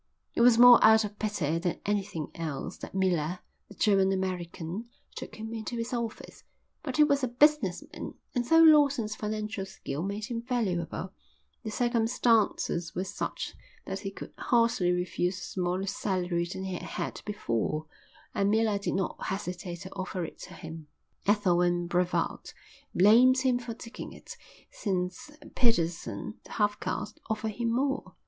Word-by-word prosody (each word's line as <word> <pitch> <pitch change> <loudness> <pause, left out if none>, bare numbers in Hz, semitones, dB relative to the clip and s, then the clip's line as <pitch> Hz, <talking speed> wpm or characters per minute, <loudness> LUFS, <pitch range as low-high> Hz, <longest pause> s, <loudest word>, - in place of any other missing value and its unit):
It - - +1
was 240 -1 +7
more 245 0 +9
out 220 0 +7
of 210 0 -8
pity 170 -7 0
than 175 0 -2
anything 200 -6 -2
else 155 -5 -4
that - - -9
Miller, 180 -3 +1 0.3
the 200 - -12
German 195 -2 +3
American, 185 +2 -3 0.3
took - - -7
him 220 +1 -6
into 225 +2 -4
his 230 +2 -3
office; 235 -2 -5 0.4
but - - -4
he 305 - +8
was 285 -2 +2
a - - +3
business 245 - +3
man, - - -7 0.2
and 245 - +1
though 325 +5 +6
Lawson's 280 -9 +5
financial 215 -1 -3
skill 160 -6 -5
made 200 +3 -3
him 230 0 -4
valuable, 190 -7 -2 0.5
the 220 - -4
circumstances 230 -6 +1
were 185 - 0
such 195 +1 -4 0.3
that 190 0 -4
he 195 0 -4
could 195 - -9
hardly 230 -7 +3
refuse 180 +1 -1
a - - -8
smaller 180 +1 -2
salary 180 -3 -1
than 190 - -5
he 190 -1 -3
had 180 - -4
had - - -4
before, 155 - -2 0.5
and 200 0 +2
Miller 215 -1 +2
did 200 - -2
not 190 -1 -2
hesitate 180 -3 -4
to 190 0 -8
offer 185 -2 -3
it - - -10
to - - -10
him. 160 -2 -9 0.4
Ethel 200 -4 +3
and 175 0 +1
Brevald 180 +1 -1 0.4
blamed 235 +7 +7
him 255 -2 +2
for 235 -2 -6
taking 230 0 -8
it, - - -11 0.4
since 185 +2 -3 0.2
Pedersen, 165 - 0
the - - -10
half 205 -1 +1
caste, - - -4
offered 220 0 -1
him 230 +2 -1
more. 270 +3 -1
200 Hz, 160 wpm, -29 LUFS, 180-230 Hz, 0.5 s, more